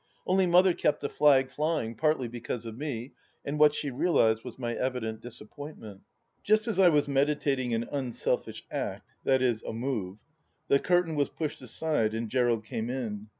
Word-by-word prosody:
Only 185 0 +3
Mother 180 +1 +5
kept 150 - 0
the 140 - -2
flag 135 -3 +4
flying, 150 -5 -1
partly 150 0 +1
because 120 0 -5
of 115 -1 -6
me, 130 -2 -5 0.3
and 145 +1 -3
what 150 0 +6
she 145 - -2
realized 125 -7 +2
was 125 - -9
my 120 -2 -3
evident 115 -3 -3
disappointment. 115 -3 -10 0.4
Just 215 +2 +2
as 215 -5 -1
I 185 -2 +7
was 150 -3 +2
meditating 140 -3 +1
an 115 +1 -2
unselfish 130 -4 -2
act - - -4
— - - -39
^viz. 130 -4 +2
a - - -5
move, 110 -6 -3 0.5
the 140 - +5
curtain 175 -1 +2
was 145 -2 +1
pushed 155 -4 -4
aside 125 -3 -1
and 115 0 -3
Gerald 120 -2 +1
came 110 +1 -4
in. 110 -5 -4
130 Hz, 175 wpm, -29 LUFS, 115-150 Hz, 0.5 s, I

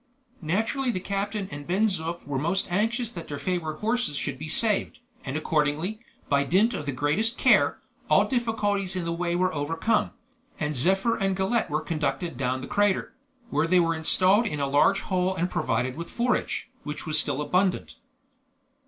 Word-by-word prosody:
Naturally 225 - 0
the 215 - -1
captain 200 +1 -3
and 145 0 -8
Ben 190 +5 +2
Zoof 170 -4 -2
were 140 -2 -2
most 170 +7 0
anxious 225 +5 0
that 170 -5 -8
their 145 - -5
favorite 160 -2 -3
horses 225 -8 0
should 135 -2 -3
be 155 +1 -6
saved, 215 +3 +2 0.3
and 135 +2 -3
accordingly, 155 +6 0 0.3
by 140 -1 +2
dint 195 - +3
of 150 - -5
the - - 0
greatest 150 - 0
care, - - +4 0.3
all - - +5
difficulties 205 -6 0
in 180 -2 -2
the 170 - -1
way 170 0 -1
were 185 +1 +1
overcome, 165 +9 0 0.5
and 150 -1 -2
Zephyr 195 - +2
and 195 -1 0
Galette 195 +5 0
were 150 +1 0
conducted 165 0 -2
down 130 0 -1
the - - -7
crater, 205 -2 +1 0.4
where 150 +3 +1
they 180 +2 +4
were 165 -1 +2
installed 185 +7 +3
in 150 -7 -3
a 140 - +1
large 145 +8 +3
hole 185 0 0
and 180 0 -1
provided 125 +3 -1
with 170 +2 -6
forage, 245 +1 -1
which 150 0 -6
was 155 -1 +4
still 135 - +1
abundant. 180 +5 0
180 Hz, 180 wpm, -26 LUFS, 150-205 Hz, 0.5 s, all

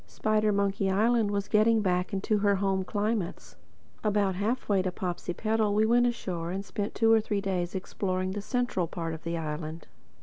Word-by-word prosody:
Spidermonkey 200 -2 +1
Island 220 +2 +3
was 200 -1 -1
getting 220 0 +3
back 180 0 0
into 205 +1 0
her 200 0 +3
home 190 -1 0
climates. 205 -2 -2 0.5
About 205 -2 +2
halfway 205 0 0
to 185 0 -1
Popsipetel 205 +4 -1
we 215 +1 +4
went 240 +2 +4
ashore 180 -8 -3
and 195 +2 -4
spent 205 +1 -4
two 225 -1 +4
or 220 - +5
three 210 -1 -1
days 185 -2 -2
exploring 185 0 -2
the 205 +1 -4
central 240 -6 -1
part 165 -1 -4
of 160 - -8
the 170 0 -2
island. 155 0 -5
200 Hz, 170 wpm, -28 LUFS, 185-215 Hz, 0.5 s, or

